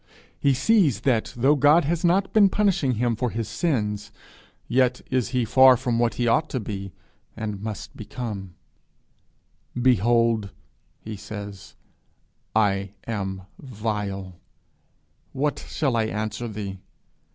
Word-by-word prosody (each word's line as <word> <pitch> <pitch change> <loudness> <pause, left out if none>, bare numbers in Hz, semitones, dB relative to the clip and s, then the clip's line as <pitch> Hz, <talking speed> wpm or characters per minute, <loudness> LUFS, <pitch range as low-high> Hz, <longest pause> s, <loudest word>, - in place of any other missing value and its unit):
He 140 -2 +3
sees 145 - +3
that 115 -4 +1
though 135 +5 +4
God 145 +3 +5
has 170 +3 -1
not 185 +3 +2
been 205 -3 +6
punishing 185 -10 +1
him 120 0 0
for 125 +2 -1
his 115 0 -3
sins, 105 - -1 0.6
yet 125 0 +2
is 125 -5 +1
he 125 -2 0
far 130 +2 +7
from 120 -1 -1
what 120 -1 +1
he 120 - 0
ought 155 +7 +2
to 130 - -2
be, 100 -3 -5 0.5
and 105 -3 -4
must 105 -1 -6
become: 105 -5 -6 1.2
'Behold,' 115 -3 +3 0.5
he 110 0 -7
says, 100 -1 -9 0.8
'I 100 -2 +1
am 95 -4 -4 0.2
vile; 105 -6 -4 0.9
what 145 +2 -1
shall 135 -6 0
I 115 -1 +2
answer 110 +2 -3
thee? 100 -3 -6
115 Hz, 130 wpm, -24 LUFS, 105-130 Hz, 1.2 s, far